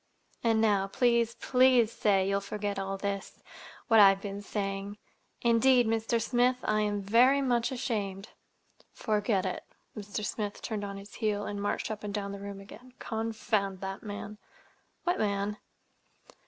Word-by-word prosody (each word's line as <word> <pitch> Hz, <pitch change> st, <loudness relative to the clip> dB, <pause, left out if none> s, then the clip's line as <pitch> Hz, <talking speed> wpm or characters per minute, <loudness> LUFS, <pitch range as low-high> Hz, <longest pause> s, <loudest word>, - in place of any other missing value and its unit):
And 225 Hz, -1 st, +3 dB
now, 205 Hz, -3 st, +2 dB
please, 235 Hz, +1 st, +2 dB
please 250 Hz, -3 st, +4 dB
say 195 Hz, -4 st, +2 dB
you'll 200 Hz, 0 st, +1 dB
forget 200 Hz, 0 st, -3 dB
all 195 Hz, 0 st, -3 dB
this—what 200 Hz, +3 st, -2 dB
I've 195 Hz, -1 st, +7 dB
been 200 Hz, 0 st, -6 dB
saying. 200 Hz, 0 st, -4 dB, 0.5 s
Indeed, 240 Hz, +1 st, +5 dB
Mr. 225 Hz, +1 st, 0 dB
Smith 245 Hz, +2 st, +2 dB
I 215 Hz, 0 st, +1 dB
am 205 Hz, -1 st, -1 dB
very 245 Hz, +7 st, +5 dB
much 245 Hz, -3 st, +1 dB
ashamed." 210 Hz, -6 st, -3 dB, 0.6 s
"Forget 210 Hz, -2 st, 0 dB
it!" 185 Hz, -1 st, -3 dB, 0.3 s
Mr. 210 Hz, 0 st, -5 dB
Smith 210 Hz, -2 st, -3 dB
turned 215 Hz, -2 st, -3 dB
on 200 Hz, -1 st, -5 dB
his 200 Hz, +1 st, -11 dB
heel 210 Hz, -2 st, -1 dB
and 205 Hz, -1 st, -4 dB
marched 205 Hz, +2 st, -2 dB
up 215 Hz, -1 st, -6 dB
and 205 Hz, -, -4 dB
down 200 Hz, -1 st, -3 dB
the 200 Hz, -, -7 dB
room 200 Hz, 0 st, -7 dB
again. 230 Hz, +5 st, -13 dB
"Confound 220 Hz, -3 st, -2 dB
that 195 Hz, 0 st, -5 dB
man!" 210 Hz, 0 st, -7 dB, 0.6 s
"What 355 Hz, 0 st, 0 dB
man?" 205 Hz, 0 st, -1 dB
210 Hz, 150 wpm, -29 LUFS, 200-230 Hz, 0.6 s, I've